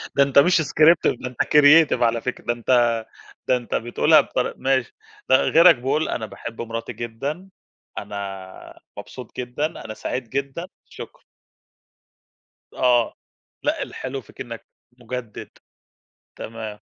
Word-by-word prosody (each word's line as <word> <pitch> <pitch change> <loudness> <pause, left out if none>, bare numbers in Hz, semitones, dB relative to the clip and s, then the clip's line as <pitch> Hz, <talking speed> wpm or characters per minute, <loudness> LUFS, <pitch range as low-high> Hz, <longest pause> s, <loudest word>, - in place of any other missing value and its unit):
ده 140 - +6
أنت 140 0 +4
مش 170 +3 +4
scripted، 155 -2 +3
ده 130 - -4
أنت 125 - -3
creative 150 +1 +5
على 115 0 +1
فكرة. 125 - -5
ده 120 - +1
أنت 120 -1 +2 0.5
ده 130 - +3
أنت 120 -1 -5
بتقولها 145 +6 +4
بطر-– 125 - -3
ماشي. 130 -3 0 0.4
ده 130 - +7
غيرك 165 +1 +6
بيقول: 135 +6 -1
"أنا 110 - -3
باحب 115 +1 -8
مراتي 115 0 -5
جدًا. 140 +11 -5 0.5
أنا 95 -2 -8 0.2
مبسوط 125 -3 -10
جدًا. 125 +4 -2
أنا 155 -8 -6
سعيد 120 +2 -5
جدًا. 140 +7 -4 0.2
شكرًا." - - -11 1.5
آه. 120 -2 +2 0.5
لأ، - - 0
الحلو 130 +1 -6
فيك - - -14
إنك 115 -2 -8 0.3
مُجدد. 120 -2 -7 0.9
تمام. 110 -2 -7
125 Hz, 130 wpm, -22 LUFS, 115-140 Hz, 1.5 s, ده